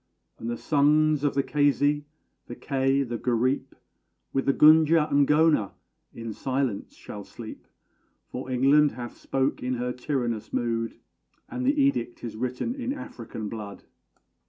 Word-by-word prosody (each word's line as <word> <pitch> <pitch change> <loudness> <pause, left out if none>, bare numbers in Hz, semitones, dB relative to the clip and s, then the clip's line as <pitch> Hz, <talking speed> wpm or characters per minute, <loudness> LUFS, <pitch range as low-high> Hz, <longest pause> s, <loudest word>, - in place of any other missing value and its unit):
And 115 - -4
the 120 - -2
sons 150 +1 +3
of 145 - +1
the 140 - +2
Keisi, 145 0 +2 0.4
the 120 - -7
Kei, 135 +1 +1
the 120 -3 -4
Gareep, 130 +3 0 0.6
With 135 - -1
the - - +6
Gunja 155 +1 +6
and 140 -1 +4
Ghona 150 -9 +3 0.4
in 115 -1 -6
silence 130 -3 -2
shall - - -9
sleep: - - -10 0.6
For 130 +1 -7
England 140 +3 +4
hath 120 0 -7
spoke 135 0 -1
in 125 +1 -1
her 125 +1 -2
tyrannous 120 -4 -3
mood, 115 -1 -2 0.5
And 255 0 -3
the 290 +2 +2
edict 200 - 0
is 115 -3 -5
written 125 - -2
in 260 0 -3
African 115 - -7
blood! 105 -2 -7
135 Hz, 145 wpm, -26 LUFS, 120-150 Hz, 0.6 s, the